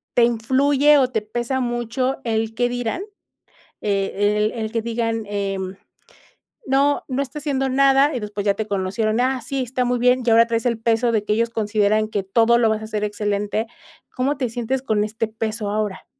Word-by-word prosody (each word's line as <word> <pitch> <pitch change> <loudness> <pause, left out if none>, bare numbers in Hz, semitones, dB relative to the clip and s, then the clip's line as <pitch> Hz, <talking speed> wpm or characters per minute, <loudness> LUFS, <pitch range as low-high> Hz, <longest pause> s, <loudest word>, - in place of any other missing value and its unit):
¿te 240 - +5
influye 265 +5 +3
o 265 -2 +4
te 220 -4 -1
pesa 240 +5 -3
mucho 240 +1 -1
el 225 -1 -1
qué 245 +2 +1
dirán? 245 - -3 0.8
Eh, 205 0 0
el 210 +1 +1
el 220 -1 -3
que 230 -1 -1
digan, 225 -1 -2
em, 195 -2 -3 0.9
no 280 0 +2
no 265 0 -1
está 280 +2 -6
haciendo 270 -2 -1
nada, 275 +2 +4
y - - -1
después 210 -1 -5
ya 200 -1 +2
te 220 - -3
conocieron: 205 +3 -1
"Ah, 260 0 0
sí, 270 +4 -3
está 250 +1 -2
muy 245 0 0
bien," 250 +1 +3
y - - +2
ahora 230 +1 +6
traes 230 0 -1
el 235 -2 0
peso 230 +1 +1
de 220 -3 +1
que 210 - +1
ellos 230 +2 +1
consideran 215 -1 +1
que 205 -2 -2
todo 230 +4 +3
lo 230 -2 +3
vas 220 0 -1
a - - -6
hacer 215 -1 -3
excelente. 210 +1 -1 0.5
¿Cómo 270 +3 0
te 255 -3 -1
sientes 245 +3 -2
con 220 -5 0
este 220 +1 -2
peso 220 -1 -3
ahora? 210 -2 -3
230 Hz, 195 wpm, -21 LUFS, 215-255 Hz, 0.9 s, ahora